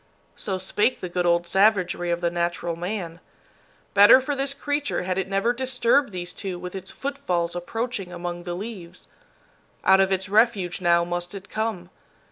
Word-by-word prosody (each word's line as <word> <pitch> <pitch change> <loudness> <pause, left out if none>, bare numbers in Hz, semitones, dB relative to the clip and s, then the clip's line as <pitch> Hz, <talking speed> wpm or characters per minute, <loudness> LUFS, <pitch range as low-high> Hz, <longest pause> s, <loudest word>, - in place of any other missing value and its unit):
So 190 -3 -3
spake 205 +6 0
the 180 - -5
good 175 0 0
old 170 0 +3
savagery 185 -2 +2
of 170 0 -1
the 170 -1 +1
natural 170 0 -2
man. 175 -1 -5 0.7
Better 205 +5 +8
for 285 +2 -2
this 275 0 0
creature 290 -2 -2
had 185 +1 -1
it 190 - -2
never 195 +5 +1
disturbed 255 0 +1
these 175 -1 -5
two 190 -3 -5
with 180 0 -7
its 190 -1 -7
footfalls 180 -12 -2
approaching 200 +1 -4
among 175 0 -5
the 175 0 -5
leaves. 185 -3 -8 0.8
Out 190 0 +6
of 195 0 +3
its 190 0 0
refuge 200 -4 +2
now 170 -1 +4
must 175 +2 -4
it 195 +1 -9
come. 215 -5 -3
185 Hz, 170 wpm, -24 LUFS, 175-220 Hz, 0.8 s, Better